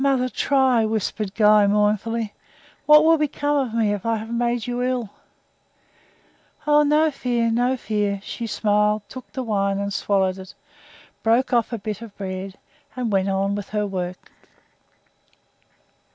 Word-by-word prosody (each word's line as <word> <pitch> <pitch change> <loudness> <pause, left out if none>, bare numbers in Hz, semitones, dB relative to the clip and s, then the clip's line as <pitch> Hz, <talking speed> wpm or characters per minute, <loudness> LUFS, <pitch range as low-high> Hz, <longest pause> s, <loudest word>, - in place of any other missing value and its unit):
"Mother, 265 -2 +2
try," 260 -4 +2
whispered 215 -2 -2
Guy, 210 -1 +5
mournfully. 210 +2 0 0.5
"What 300 0 +8
will 325 0 +4
become 290 0 0
of 225 - -8
me 220 -3 +2
if 205 - -5
I 230 0 0
have 220 +1 -6
made 235 -1 0
you 245 0 -3
ill?" 250 -4 -2 1.5
"Oh, 295 0 +5
no 300 +2 +3
fear, 240 -4 -1
no 245 +3 +1
fear!" 205 -4 -1
She 230 +2 -5
smiled, 210 -1 +1
took 255 +3 -11
the 260 - -4
wine 200 -3 0
and 200 0 -3
swallowed 190 -2 0
it 190 0 -11 0.7
broke 235 +4 +2
off 235 -1 +2
a 230 - -2
bit 210 0 -5
of 225 -3 -10
the - - -40
bread, 190 0 -6 0.4
and 245 -3 -2
went 195 0 +1
on 195 +1 0
with 205 -1 -5
her 210 -1 -1
work. 185 -2 -5
220 Hz, 155 wpm, -22 LUFS, 200-250 Hz, 1.5 s, What